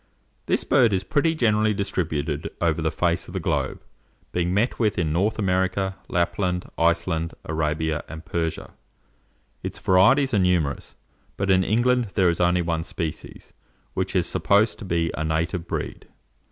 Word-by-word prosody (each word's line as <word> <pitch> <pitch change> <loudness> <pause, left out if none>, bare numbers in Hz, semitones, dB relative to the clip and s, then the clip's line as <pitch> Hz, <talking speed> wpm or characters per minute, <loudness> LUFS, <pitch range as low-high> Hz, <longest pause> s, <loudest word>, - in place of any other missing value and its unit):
This - - +2
bird 115 -5 +4
is 95 0 0
pretty 160 - +1
generally 110 -5 +2
distributed 80 -6 -2
over - - +1
the - - +1
face 85 -1 0
of - - -10
the - - 0
globe, - - -1 0.5
being 90 0 0
met 105 +7 0
with 110 -3 +1
in 80 -4 0
North 100 +6 +1
America, 95 -1 0
Lapland, 90 +1 0
Iceland, 85 0 0
Arabia, 80 0 -1
and 80 +1 -8
Persia. 80 -2 -3 0.9
Its - - -5
varieties 130 +9 +4
are 105 - +3
numerous; 90 -6 0 0.4
but 100 0 +1
in 95 0 +4
England 120 +4 +2
there 95 -4 +4
is 85 - -4
only 90 0 +3
one 85 -1 -1
species, 80 -2 -6 0.4
which - - -2
is - - +3
supposed 105 +2 +2
to 110 - -7
be 85 -2 0
a 80 - -2
native 85 +2 -1
breed. - - -5
90 Hz, 155 wpm, -24 LUFS, 80-100 Hz, 0.9 s, bird